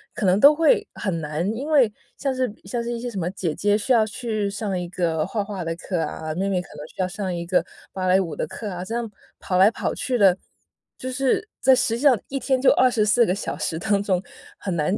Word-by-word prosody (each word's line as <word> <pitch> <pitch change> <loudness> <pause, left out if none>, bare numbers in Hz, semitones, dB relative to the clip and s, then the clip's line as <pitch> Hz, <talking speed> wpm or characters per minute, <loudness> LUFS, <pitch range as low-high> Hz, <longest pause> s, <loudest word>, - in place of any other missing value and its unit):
可 - - -2
能 185 +1 +4
都 285 +6 +8
会 330 +9 +3
很 180 -6 -2
难。 155 +3 -2
因 270 +6 -5
为 270 -8 +4 0.3
像 275 -2 -1
是 255 -3 -1
像 235 +5 -2
是 235 - -3
一 235 - -3
些 245 +1 -4
什 200 - -4
么 175 0 -1
姐 175 -5 -2
姐 205 +5 +2
需 235 +5 +1
要 225 - +5
去 215 -3 -2
上 200 -1 -3
一 175 -1 -5
个 165 -3 0
画 205 +1 -2
画 200 -3 -5
的 165 0 -3
课 180 +1 -3
啊， 155 0 -4
妹 190 +4 -1
妹 190 -2 +1
可 180 - -15
能 150 +1 -8
需 - - -21
要 185 - +1
上 190 0 -4
一 170 0 -4
个 180 +1 +2 0.3
芭 185 -1 -2
蕾 185 +1 +5
舞 175 -5 -3
的 - - -3
课 205 +3 -6
啊， 180 -1 -5
这 225 +5 -5
样 235 -1 -2 0.3
跑 180 - -1
来 195 +2 +7
跑 - - -2
去 255 -1 -1
的， 195 -5 +5 0.6
就 255 - -5
是 270 +10 0
在 265 - +6
实 245 -2 +1
际 - - -7
上 265 -7 +5
1 275 - -2
天 260 +1 +1
就 270 - +6
24 240 -3 +4
个 185 - 0
小 - - -4
时 160 - -2
当 200 +2 +1
中 190 -3 +1 0.4
很 190 -3 -3
难 165 +5 0
200 Hz, 265 characters per minute, -23 LUFS, 180-240 Hz, 0.6 s, 都